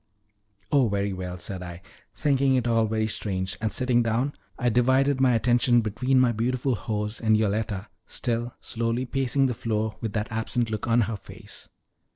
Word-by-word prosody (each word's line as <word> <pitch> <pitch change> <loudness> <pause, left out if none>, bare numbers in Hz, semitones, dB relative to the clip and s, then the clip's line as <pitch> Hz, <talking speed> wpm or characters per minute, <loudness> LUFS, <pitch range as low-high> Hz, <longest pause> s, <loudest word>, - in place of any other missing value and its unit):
"Oh, 135 -4 +4
very 100 0 -1
well," 90 -1 -5
said 90 +1 -6
I, 90 0 -8 0.3
thinking 140 -2 +2
it 125 -2 +1
all 115 -1 +3
very 110 0 0
strange, 95 -3 -2
and 110 -1 0
sitting 125 -2 +2
down 120 +5 0 0.2
I 125 -1 +1
divided 130 +3 +3
my 125 -2 +4
attention 120 +1 +3
between 125 +5 +1
my 125 -2 +4
beautiful 125 +3 0
hose 105 +1 -3
and 110 -1 +4
Yoletta, 105 -1 -1 0.2
still 120 0 -2
slowly 115 +2 -2
pacing 135 +1 +1
the 125 - +1
floor 110 -2 -2
with 110 -3 -3
that 105 +2 -2
absent 115 +1 -1
look 110 +1 -3
on 120 +1 +4
her 110 0 -1
face. - - -11
115 Hz, 175 wpm, -26 LUFS, 105-125 Hz, 0.3 s, Oh